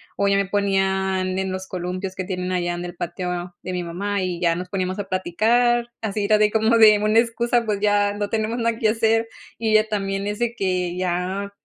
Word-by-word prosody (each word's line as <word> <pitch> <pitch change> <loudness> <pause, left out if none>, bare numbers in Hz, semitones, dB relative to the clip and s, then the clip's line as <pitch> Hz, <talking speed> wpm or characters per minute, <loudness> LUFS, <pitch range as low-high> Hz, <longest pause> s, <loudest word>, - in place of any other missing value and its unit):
o 200 - +1
ya 200 - +3
me 200 - +1
ponían 190 -1 0
en 190 -1 -2
los 190 0 -5
columpios 185 +1 -4
que 185 - -3
tienen 180 0 -3
allá 175 -1 -1
en 175 0 -5
el 175 0 -7
patio 175 0 -4
de 185 - -4
mi 180 - -2
mamá 200 +4 -3
y 180 -2 -2
ya 170 -2 +2
nos 180 +1 -6
poníamos 185 0 -2
a 200 -1 -5
platicar. 235 +6 +1
Así 210 -1 -2
era 215 +1 +4
de 210 0 +3
como 220 +1 +3
de 215 -2 +7
una 215 +2 +2
excusa, 235 0 +1
pues 210 -2 -1
ya 205 -1 +2
no 205 0 -3
tenemos 225 +2 -1
nada 230 -1 0
que 220 -1 +2
hacer. 225 +1 +2 0.3
Y 225 -1 -1
ella 215 0 +4
también 195 -1 -2
es 210 0 -3
de 235 -1 -1
que 180 -4 -1
ya, 185 +2 -2
200 Hz, 220 wpm, -22 LUFS, 185-215 Hz, 0.3 s, de